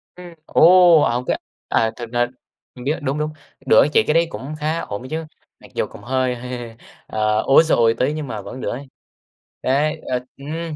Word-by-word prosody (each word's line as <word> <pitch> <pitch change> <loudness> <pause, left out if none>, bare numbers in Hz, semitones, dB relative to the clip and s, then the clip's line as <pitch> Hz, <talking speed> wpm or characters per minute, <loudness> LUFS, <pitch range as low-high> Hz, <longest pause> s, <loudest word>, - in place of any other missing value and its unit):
Ừm, 180 -1 -11
ồ! 175 -1 +6
Ở 120 -1 +1
cái - - 0 0.3
à, 110 0 +1
thực 120 -2 -8
ra 120 0 +1 0.5
biết, 130 +4 -2
đúng, 140 0 -2
đúng, 155 0 -2 0.3
đỡ - - +6
chị - - +5
cái 150 - +3
đấy 165 +1 +4
cũng 145 -1 -7
khá 155 +2 -1
ổn 105 0 -6
chứ, 160 +1 -3 0.3
mặc - - -16
dù - - 0
cũng - - -12
hơi 130 0 0
hơi, 120 -2 -7 0.3
ờ, 110 0 +1
ối 135 +4 +6
giời 160 - +2
ơi 115 -1 +4
tí 130 +4 +1
nhưng 155 -2 -5
mà 110 -4 -5
vẫn 130 +6 -8
đỡ - - -2
ấy. 135 +2 -6 0.7
Đấy, 150 +4 0
ờ, 125 - -1 0.2
ừm. 160 +3 -5
135 Hz, 200 wpm, -20 LUFS, 120-155 Hz, 0.7 s, ồ